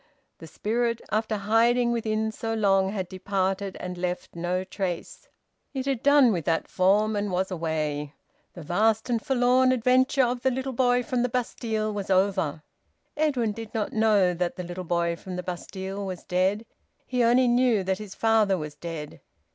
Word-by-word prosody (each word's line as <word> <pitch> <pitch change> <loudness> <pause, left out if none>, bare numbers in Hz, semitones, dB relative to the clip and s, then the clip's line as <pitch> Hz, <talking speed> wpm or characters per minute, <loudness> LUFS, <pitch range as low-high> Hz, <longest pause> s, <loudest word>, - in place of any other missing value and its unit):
The 165 - -10
spirit, 230 +7 -1
after 215 0 0
hiding 235 +4 +3
within 220 -1 -1
so 225 +1 -3
long, 195 -3 +3
had 190 -3 -3
departed 190 +1 -2
and 180 -1 -6
left 180 -1 -4
no 175 +2 -1
trace. 190 -2 -5 0.5
It 265 -1 -2
had 270 -4 -1
done 285 -3 +5
with 170 -4 -2
that 165 -1 0
form 205 +4 +2
and 205 0 -1
was 185 +1 -1
away. 155 -4 -2 0.4
The 175 - -8
vast 220 +8 +1
and 230 -2 0
forlorn 255 -1 +3
adventure 255 +2 +3
of 245 0 -1
the 265 - +2
little 265 +1 -3
boy 245 0 +2
from 245 +1 -1
the 250 - +1
Bastille 225 -3 -2
was 200 -2 -5
over. 185 -6 +1 0.5
Edwin 275 -8 +1
did 225 +1 -8
not 215 -2 -2
know 210 -5 +3
that 175 0 -2
the 180 - -5
little 175 +1 -6
boy 170 0 0
from 185 +2 -8
the 180 - -4
Bastille 190 +2 -5
was 185 -2 -6
dead. 190 +4 0 0.4
He 250 -1 0
only 245 +2 +4
knew 240 -4 +3
that 190 +1 -1
his 210 -3 -8
father 220 -4 +3
was 150 -3 -6
dead. 150 -1 -7
205 Hz, 175 wpm, -26 LUFS, 180-235 Hz, 0.5 s, done